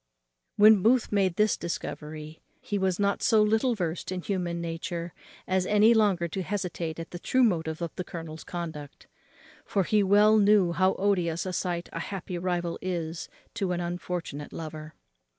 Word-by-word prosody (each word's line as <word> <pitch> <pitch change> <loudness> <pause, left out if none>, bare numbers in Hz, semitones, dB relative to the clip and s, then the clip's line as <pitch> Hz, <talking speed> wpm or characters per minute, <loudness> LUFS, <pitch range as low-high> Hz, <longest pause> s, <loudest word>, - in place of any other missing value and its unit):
When 210 -1 +7
Booth 235 +3 +4
had - - -15
made 195 -4 +2
this 210 +1 +3
discovery, 155 -2 -6 0.2
he 205 - -3
was 190 -1 0
not 200 0 +1
so 220 -3 +4
little 220 +3 +2
versed 175 -2 -3
in 185 -1 -3
human 175 -3 -2
nature, 170 0 -4 0.3
as 185 0 +1
any 210 +2 +5
longer 200 -6 +2
to 190 +4 -4
hesitate 180 -4 -3
at 165 - -7
the 175 - -6
true 255 +8 +2
motive 160 -8 +1
to 170 0 -3
the 180 - -3
colonel's 165 -2 -8
conduct; 160 -5 -7 0.6
for 195 - 0
he 210 +3 +2
well 210 +2 +5
knew 200 -3 +4
how 185 +2 +2
odious 180 -4 0
a 185 - -3
sight 175 -1 -2
a - - -3
happy 185 -2 -5
rival 175 -1 -2
is 170 -3 -4 0.2
to 195 -5 -1
an 175 - -2
unfortunate 175 -4 -4
lover. 155 -1 -8
180 Hz, 170 wpm, -27 LUFS, 170-205 Hz, 0.6 s, When